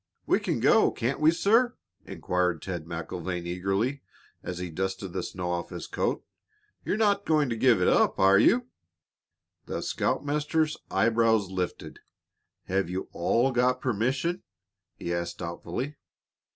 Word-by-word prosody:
"We - - +3
can - - -2
go, - - +5
can't 125 +4 -2
we, 150 +1 +5
sir?" 225 +9 +3 0.3
inquired 90 -3 -1
Ted 85 -4 -5
MacIlvaine, 85 +1 -4
eagerly, 95 +10 -1 0.4
as 90 - -5
he 90 -1 -5
dusted 95 +1 -3
the 95 - -2
snow 90 0 -4
off 85 0 -3
his - - -6
coat. - - -2 0.6
"You're 205 - -1
not 205 -2 +2
going 155 -6 +2
to 115 - -1
give 115 -2 +4
it - - +3
up, - - +3
are 95 +1 +6
you?" 245 +3 +4 1.0
The - - -3
scoutmaster's 150 +2 0
eyebrows 110 -1 +2
lifted. 90 -2 -4 0.6
"Have 95 -2 -1
you 95 +1 -4
all 115 +10 +2
got 125 +1 +2
permission?" 130 - -1 0.5
he 85 - -4
asked 85 0 -3
doubtfully. 90 - -5
100 Hz, 140 wpm, -27 LUFS, 90-140 Hz, 1.0 s, are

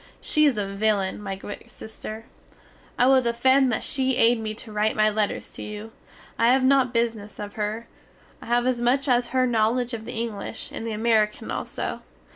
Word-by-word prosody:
She 305 0 +2
is 265 -6 +1
a 205 - 0
villain, 200 0 0
my 195 -1 -4
great 200 +1 -9
sister. 220 0 -9 0.7
I 245 - +4
will 265 0 +6
defend 255 +2 +3
that 220 - -1
she 265 -1 +1
aid 235 +1 +4
me 215 -1 -4
to 220 - -9
write 210 +1 +1
my 215 0 +3
letters 210 -1 -2
to - - -9
you; 210 +1 -7 0.5
I 230 +1 +5
have 260 0 +3
not 260 -1 +4
business 230 -3 -2
of 205 -1 -6
her. 215 +2 -3 0.6
I - - -11
have 240 +1 +2
as 250 -2 0
much 265 +4 +2
as 245 -2 +3
her 255 +1 +2
knowledge 240 +1 +1
of 220 -1 -5
the - - -6
English, 225 -1 -5
and 230 - -5
the - - -2
American 215 -1 +1
also. - - -4
230 Hz, 195 wpm, -25 LUFS, 215-245 Hz, 0.7 s, will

